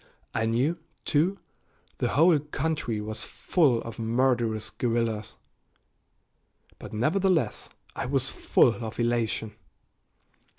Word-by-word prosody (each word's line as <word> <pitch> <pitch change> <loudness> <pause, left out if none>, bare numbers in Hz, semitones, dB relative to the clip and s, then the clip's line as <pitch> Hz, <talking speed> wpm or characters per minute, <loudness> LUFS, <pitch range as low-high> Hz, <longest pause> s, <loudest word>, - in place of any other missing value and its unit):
I 110 0 0
knew, 135 +9 +1 0.3
too, 170 +7 +2 0.6
the - - +1
whole 160 +3 +5
country 150 -5 -2
was 110 +1 -5
full 140 -10 +1
of 115 0 -8
murderous 115 -1 +1
guerrillas. 115 -3 -1 1.4
But - - -9
nevertheless 165 - +1 0.3
I - - -3
was 130 -1 +1
full 120 -1 +2
of 110 +1 -6
elation. 115 -2 0
120 Hz, 100 wpm, -27 LUFS, 115-150 Hz, 1.4 s, whole